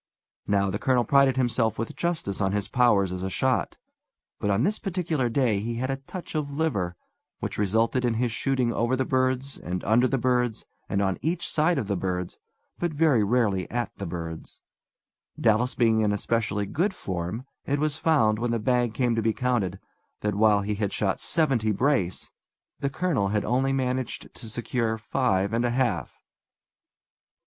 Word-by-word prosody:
Now, 100 -1 +2
the 100 - -2
colonel 125 -2 +2
prided 135 +1 +4
himself 115 -3 +1
with 115 - -4
justice 165 - -2
on 95 0 +1
his 105 -1 -1
powers 105 -7 +3
as 90 0 -4
a 95 - -2
shot; - - 0 0.6
but 105 - -1
on 100 +4 +2
this 210 +7 +1
particular 170 - -1
day 115 -4 +2
he 115 +3 -3
had 130 +3 -2
a 135 - -2
touch 155 +7 -9
of 150 -2 -1
liver, 140 - -1 0.4
which - - -4
resulted 115 +5 +1
in 120 -2 +1
his 120 +1 0
shooting 125 -1 0
over 120 +2 +1
the 130 0 0
birds, 130 +1 0
and 90 0 -4
under 120 +4 +4
the 135 - 0
birds, 125 -2 0 0.2
and 100 0 +1
on 95 -1 0
each 170 +2 -1
side 160 +3 +2
of 125 - -1
the 100 0 -1
birds, 90 -1 -3 0.4
but 175 -1 0
very 145 -8 +4
rarely 105 -4 +1
at 120 -3 -3
the 100 - -5
birds. 80 -1 -6 0.8
Dallas 115 +3 +2
being 115 -2 +3
in 105 -1 +2
especially 105 -1 0
good 185 - -1
form, 95 +6 -4 0.2
it 140 - +1
was 150 0 0
found, 140 -10 +3
when 120 +1 -1
the 115 - +1
bag 120 0 +1
came 125 -2 +1
to 115 - 0
be 110 0 +1
counted, 120 -8 0 0.4
that, 105 0 0
while 105 0 +4
he 105 +1 -2
had 100 -1 -2
shot 100 -3 -1
seventy 135 -10 +1
brace, 105 -5 0 0.5
the 140 - 0
colonel 140 - 0
had 105 +1 0
only 130 +4 +1
managed 130 -2 -2
to 115 - -7
secure 115 0 -1
five 100 -4 0
and 115 +1 +1
a 120 - +2
half! 120 -7 -1
115 Hz, 180 wpm, -26 LUFS, 105-130 Hz, 0.8 s, prided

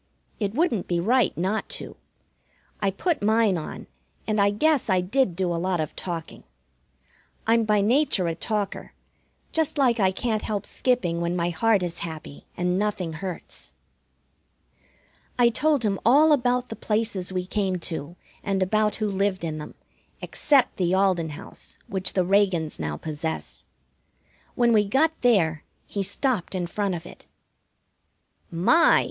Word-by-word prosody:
It 205 0 -2
wouldn't 270 - +1
be 175 -1 0
right 235 +4 +2
not 190 +6 -1
to. - - -9 0.9
I 200 - +2
put 310 - -1
mine 215 -1 +3
on, 160 - -6 0.4
and 215 -1 +1
I 200 - +5
guess 265 +5 +1
I 185 -1 +4
did 195 +1 +1
do 180 -1 0
a 165 - -2
lot 185 -1 0
of 155 - -3
talking. 170 -3 -6 1.0
I'm 225 0 +3
by 210 -1 +3
nature 230 -3 +2
a 165 - 0
talker, 205 +3 -3 0.6
just 320 -1 0
like 245 -4 +3
I 190 -2 +4
can't 215 +2 -1
help 205 -2 -3
skipping 180 -10 0
when 170 +1 -1
my 175 0 0
heart 200 +3 +2
is 175 -1 -4
happy 155 -3 -7
and 180 +1 0
nothing 195 -5 -2
hurts. 160 - -7 1.6
I 240 -1 +5
told 290 0 +1
him 195 -2 0
about 285 +1 +5
all 250 0 +2
the 225 - -8
places 210 -5 -1
we 180 -1 -2
came 190 -1 -1
to, 165 0 -4 0.3
and 195 -1 +1
about 215 +2 +1
who 215 - -1
lived 195 -1 0
in 155 -2 -3
them, 150 - -9 0.4
except 275 -4 +2
the 180 0 +1
Alden 185 -4 +2
house 145 - -9
which 190 -1 -2
the 185 -2 +1
Reagans 190 -5 +1
now 75 -1 -3
possess. 160 +1 -5 0.9
When 240 -1 +3
we 210 -2 +5
got 270 +10 +2
there 170 -11 +3 0.2
he 200 - -3
stopped 205 0 -1
in 180 -1 -1
front 195 +1 -2
of 165 - -7
it. - - -13 1.2
"My!" 215 - +5
195 Hz, 155 wpm, -25 LUFS, 175-230 Hz, 1.6 s, I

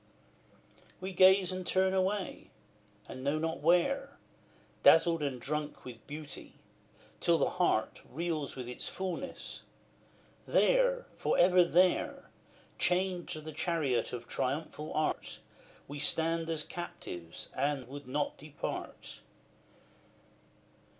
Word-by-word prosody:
We 190 +1 -5
gaze 185 +1 +6
and 185 0 -4
turn 190 +1 +2
away, 190 +1 -1 0.6
and 130 - -8
know 140 +3 +1
not 160 -2 -2
where, 270 - +2 0.6
Dazzled 165 0 +6
and 140 -4 -2
drunk 150 +3 -3
with 120 -3 -10
beauty, 150 0 -8 0.6
till 170 -1 +4
the - - +1
heart 110 -10 +1
Reels 160 -1 -3
with 125 -2 -6
its 125 - -6
fulness; 190 +8 -5 0.9
there - - +3
for - - +1
ever 180 0 +6
there 180 +1 +2 0.5
Chained 180 -1 +1
to 155 - -5
the 155 0 -8
chariot 145 -8 0
of 125 - -6
triumphal 150 +3 -3
Art, 155 - -1 0.5
We 145 +1 -6
stand 165 +2 +1
as 160 -2 -1
captives, 90 - -7
and 135 -2 0
would 140 +1 -9
not 145 +3 -1
depart. 150 0 -6
160 Hz, 115 wpm, -32 LUFS, 145-185 Hz, 0.9 s, gaze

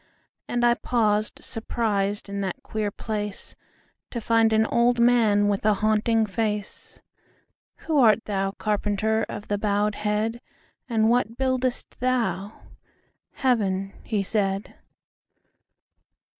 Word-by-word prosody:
And 240 0 +1
I 240 - +5
paused 215 -3 0
surprisedIn 205 -3 -2
that 190 -2 -4
queer 215 -1 -2
placeTo 210 -1 -5 0.6
find 225 0 +3
an 220 0 +3
old 240 +2 +2
manWith 210 -4 +3
a 215 -1 +3
haunting 220 +2 +2
face."Who 210 - -5
art 220 -3 +5
thou, 195 -2 -1
carpenter, 215 +1 0
Of 205 - -7
the 205 -1 -1
bowed 205 0 +1
head; 210 +3 -1 0.5
And 220 -2 +2
what 235 -1 +1
buildest 260 -1 -1
thou?""Heaven," 205 -1 -2
he 205 -2 -1
said. 195 0 -1
215 Hz, 100 wpm, -25 LUFS, 205-230 Hz, 0.6 s, I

